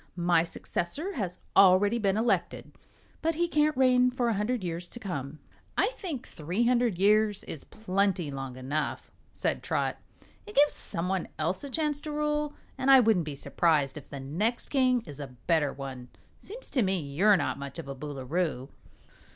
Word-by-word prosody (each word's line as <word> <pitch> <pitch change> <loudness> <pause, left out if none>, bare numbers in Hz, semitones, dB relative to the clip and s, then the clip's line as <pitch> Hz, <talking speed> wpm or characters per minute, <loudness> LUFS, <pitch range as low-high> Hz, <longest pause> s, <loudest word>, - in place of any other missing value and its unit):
My 175 -2 +3
successor 230 - -3
has 185 - -3 0.2
already 200 +4 +6
been 200 -2 +1
elected, 230 +2 0 0.5
but 325 0 +1
he 345 +2 +1
can't 300 -3 +2
reign 250 -1 +5
for 250 -1 0
a - - +2
hundred 210 +2 -1
years 175 0 -4
to 240 - -8
come." 155 - -5 0.4
"I - - +3
think 330 - -6
three 175 +9 -2
hundred 240 -5 +2
years 210 +1 +3
is 150 - -7
plenty 195 -6 -1
long 135 -2 -6
enough," 145 +4 -3 0.2
said - - -1
Trot. - - -1 0.5
"It 420 - -10
gives 290 +1 +5
some 175 -2 -3
one 190 -1 -1
else 170 - -1
a 280 - -5
chance 300 0 -1
to 305 - -5
rule, 300 0 -1 0.2
an' 265 - +1
I 270 -1 +9
wouldn't 220 -8 +3
be 150 -2 -5
s'prised 150 -1 +1
if 150 - -10
the 140 - -6
next 180 - -2
king 255 -3 +3
is 145 -2 -10
a 140 - -5 0.2
better 155 -4 +2
one. 130 -2 -7 0.3
Seems 475 +5 -9
to 255 - +2
me 190 -2 +1
you're 170 +8 +3
not 155 - -2
much 140 0 -7
of 165 - -7
a 135 - -4
Boolooroo." 140 +1 -3
195 Hz, 180 wpm, -29 LUFS, 155-250 Hz, 0.5 s, I